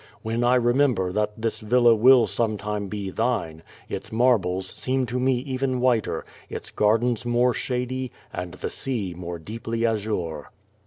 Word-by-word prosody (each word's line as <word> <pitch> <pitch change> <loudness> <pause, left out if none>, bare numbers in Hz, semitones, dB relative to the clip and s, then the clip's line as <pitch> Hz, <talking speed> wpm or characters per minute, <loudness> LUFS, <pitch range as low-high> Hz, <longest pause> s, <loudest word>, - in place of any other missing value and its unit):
When 115 +2 -1
I 125 +1 +4
remember 120 -6 +2
that 105 +2 -1
this 115 0 -2
villa 120 +2 +4
will 120 +2 +6
sometime 105 -1 -2
be 100 -1 -4
thine, 90 -9 -1 0.3
its - - -6
marbles 95 -6 +1
seem 130 0 0
to 125 +1 -2
me 130 +1 +3
even 130 -1 -1
whiter, 120 -3 +1 0.2
its - - -7
gardens 115 +3 +2
more 120 +1 +2
shady, 125 +1 -3 0.2
and 90 0 -5
the - - -5
sea 110 -9 -3
more 85 0 -5
deeply 115 +6 -3
azure. 100 -9 -2
115 Hz, 150 wpm, -25 LUFS, 100-125 Hz, 0.3 s, will